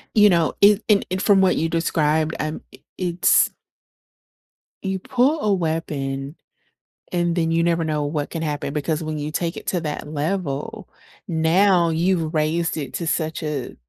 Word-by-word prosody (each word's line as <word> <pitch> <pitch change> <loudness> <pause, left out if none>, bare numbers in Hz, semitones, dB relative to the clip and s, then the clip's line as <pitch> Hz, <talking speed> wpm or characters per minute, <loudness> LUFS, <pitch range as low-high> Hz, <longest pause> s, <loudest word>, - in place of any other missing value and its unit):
You 210 -1 +7
know, 170 -4 +2
it 205 +1 +5
and 205 -2 +4
and 185 +1 -2
from 200 -2 +4
what 190 -1 +3
you 165 - 0
described, 160 -1 +1
I'm 155 +1 -3
i - - -15 0.2
it's 180 -1 +3 1.3
You 190 -1 -2
pull 265 - +1
a 210 - +2
weapon, 150 -5 -3 0.8
and 175 -1 0
then 165 -1 0
you 165 0 +2
never 170 -1 +1
know 155 -2 -1
what 145 0 -3
can 165 - -4
happen 145 -2 -3
because 155 +1 -2
when 155 -1 -4
you 150 +1 -4
take 170 +2 -2
it - - -9
to 180 - 0
that 150 -2 -4
level, 160 +6 -3 0.4
now 170 +2 +3
you've 165 0 0
raised 160 +2 0
it 145 -3 -5
to 170 - -3
such 160 -1 -1
a 150 -4 -4
165 Hz, 170 wpm, -22 LUFS, 155-185 Hz, 1.3 s, You